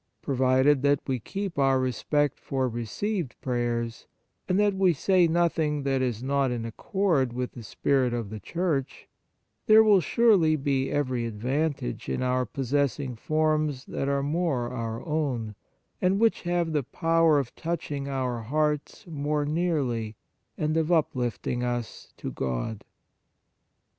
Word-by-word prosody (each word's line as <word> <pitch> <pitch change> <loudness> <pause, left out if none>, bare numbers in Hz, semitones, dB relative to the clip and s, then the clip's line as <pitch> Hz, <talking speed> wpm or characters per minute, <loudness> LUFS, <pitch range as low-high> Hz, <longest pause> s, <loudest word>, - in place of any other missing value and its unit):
Provided 130 +1 +3
that 140 0 +3
we 130 -2 -1
keep 195 - -4
our 135 -1 +4
respect 135 +3 0
for 130 -1 -1
received 125 - -3
prayers, 120 -2 -2 0.4
and 185 +2 +2
that 205 -1 +3
we 190 -2 +3
say 180 +4 +3
nothing 160 -3 +1
that 135 -1 +1
is 120 -2 -2
not 140 0 +1
in 120 -2 -3
accord 140 - 0
with 125 0 -3
the 120 - -10
spirit 130 +3 +1
of 115 -4 -3
the 110 - -6
Church, 155 - -2 0.6
there 220 0 +8
will 205 -4 +5
surely 195 -8 +4
be 135 -2 0
every 130 -5 -1
advantage 125 - -2
in 65 - -1
our 125 -1 +1
possessing 135 +1 -1
forms 155 0 0
that 135 - -3
are 140 0 +1
more 145 -5 0
our 115 -2 -4
own, 140 -9 -1 0.5
and 190 +2 +2
which 225 0 +3
have 175 -2 0
the 150 - +2
power 165 +3 +2
of 135 -4 -2
touching 150 -4 -3
our 130 -3 -2
hearts 150 - -1
morej 150 -2 -2
nearly, 140 -10 -1 0.4
and 155 +1 0
of 160 +1 +1
uplifting 125 - 0
us 120 -2 -4
to - - -5
God. 65 - -3
140 Hz, 145 wpm, -27 LUFS, 125-160 Hz, 0.6 s, there